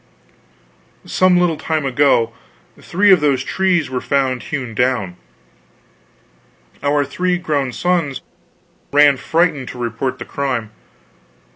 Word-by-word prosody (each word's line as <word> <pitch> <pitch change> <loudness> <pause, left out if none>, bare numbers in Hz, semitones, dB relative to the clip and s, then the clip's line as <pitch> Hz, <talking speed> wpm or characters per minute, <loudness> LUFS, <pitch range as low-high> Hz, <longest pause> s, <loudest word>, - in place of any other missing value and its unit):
Some 185 -1 +3
little 175 -3 +1
time 155 -2 -2
ago, 130 -4 +2 0.5
three 200 +4 +2
of 185 - +7
those 140 -3 +1
trees 185 -1 0
were 130 -1 -4
found 130 -3 0
hewn 130 -6 -5
down. 120 -6 0 1.7
Our 145 0 +1
three 180 +3 -1
grown 145 -6 -1
sons 150 0 -1 0.7
ran 145 -1 +5
frightened 160 -4 0
to - - -8
report 120 +2 -3
the - - -8
crime. 125 -6 -3
140 Hz, 115 wpm, -18 LUFS, 130-165 Hz, 1.7 s, of